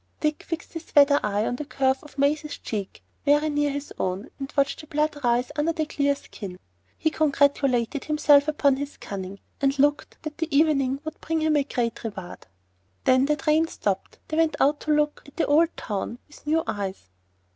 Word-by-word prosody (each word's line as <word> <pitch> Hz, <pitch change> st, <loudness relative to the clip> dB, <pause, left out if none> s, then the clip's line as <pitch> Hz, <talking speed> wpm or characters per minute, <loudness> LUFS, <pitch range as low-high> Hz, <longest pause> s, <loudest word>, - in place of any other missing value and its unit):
Dick 305 Hz, -1 st, 0 dB
fixed 330 Hz, -1 st, -6 dB
his 330 Hz, -1 st, -9 dB
weather 285 Hz, 0 st, +7 dB
eye 210 Hz, +1 st, 0 dB
on 245 Hz, -, -1 dB
the 300 Hz, -, -4 dB
curve 265 Hz, -2 st, +1 dB
of 295 Hz, -, -15 dB
Maisie's 295 Hz, +2 st, +1 dB
cheek, 205 Hz, -4 st, -5 dB, 0.2 s
very 295 Hz, +1 st, +3 dB
near 290 Hz, 0 st, +1 dB
his 285 Hz, +1 st, -5 dB
own, 190 Hz, +7 st, -2 dB
and 275 Hz, +1 st, -5 dB
watched 280 Hz, +2 st, +2 dB
the 310 Hz, -, -14 dB
blood 300 Hz, 0 st, 0 dB
rise 245 Hz, +2 st, +2 dB
under 310 Hz, +2 st, +1 dB
the 315 Hz, -1 st, -1 dB
clear 285 Hz, -2 st, +1 dB
skin. 195 Hz, -8 st, -9 dB, 0.4 s
He 315 Hz, -, +1 dB
congratulated 280 Hz, -4 st, +2 dB
himself 295 Hz, -1 st, +5 dB
upon 285 Hz, -3 st, +3 dB
his 285 Hz, +1 st, -5 dB
cunning, 195 Hz, 0 st, -6 dB, 0.2 s
and 275 Hz, 0 st, +2 dB
looked 290 Hz, +1 st, +1 dB
that 310 Hz, 0 st, -6 dB
the 325 Hz, -1 st, -1 dB
evening 275 Hz, -3 st, +2 dB
would 315 Hz, -, -7 dB
bring 325 Hz, 0 st, -1 dB
him 310 Hz, -1 st, +2 dB
a 290 Hz, -, +3 dB
great 240 Hz, -4 st, -2 dB
reward. 190 Hz, -, -7 dB, 0.6 s
When 260 Hz, +1 st, +4 dB
the 300 Hz, -, +3 dB
train 305 Hz, +2 st, +2 dB
stopped -, -, -3 dB
they 310 Hz, -, -2 dB
went 325 Hz, -1 st, +3 dB
out 290 Hz, +2 st, +3 dB
to 310 Hz, -, -2 dB
look 300 Hz, 0 st, +1 dB
at 285 Hz, -, -15 dB
an -, -, +3 dB
old 320 Hz, +3 st, +3 dB
town 210 Hz, +2 st, -4 dB
with 295 Hz, 0 st, -17 dB
new 320 Hz, +2 st, +2 dB
eyes. 195 Hz, -, -4 dB
285 Hz, 195 wpm, -25 LUFS, 260-305 Hz, 0.6 s, weather